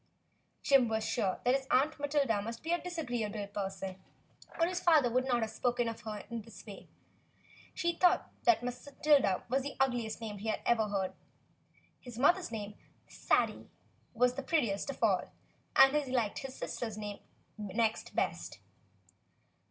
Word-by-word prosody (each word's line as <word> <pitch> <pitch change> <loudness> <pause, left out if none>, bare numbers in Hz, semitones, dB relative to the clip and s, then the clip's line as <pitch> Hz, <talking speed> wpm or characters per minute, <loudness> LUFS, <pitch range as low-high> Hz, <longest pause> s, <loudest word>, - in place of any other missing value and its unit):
Jim 270 -3 +5
was 220 -1 -1
sure 195 -6 0
that 250 - +4
his 270 0 -1
Aunt 290 +3 +2
Matilda 280 -7 +1
must 230 +3 -6
be 325 - -2
a 345 - +1
dis 355 -1 -6
agreeable 225 -8 -2
person, 195 -2 -5 0.6
or 330 - +5
his 360 +1 -2
father 310 -9 +4
would 255 +2 +1
not 240 -2 +2
have 220 -1 -2
spoken 245 0 0
of 230 0 -5
her 210 -1 -6
in 235 -1 -5
this 225 0 -13
way. 205 -3 -10 0.9
He 340 0 0
thought 360 +1 +3 0.3
Matilda 255 -3 +1
was 265 +3 +1
the 280 +1 -6
ug 270 -2 +3
liest 225 -3 -3
name 215 -3 -6
he 215 - -6
had 220 - -1
ever 225 -2 +3
heard. 195 -2 -2 0.9
His 245 -3 -10
mother's 345 +4 +3
name, 210 -2 -5 0.3
Sadie, - - 0 0.5
was 250 +2 +3
the 275 - -4
prettiest 255 -8 0
of 275 - -5
all, - - +2 0.4
and 270 +2 +7
he 285 -4 0
liked 235 -5 0
his 265 -1 -7
sister's 225 -3 -4
name 205 -1 -5 0.4
next 215 +2 -1
best. - - -2
240 Hz, 165 wpm, -32 LUFS, 215-275 Hz, 0.9 s, and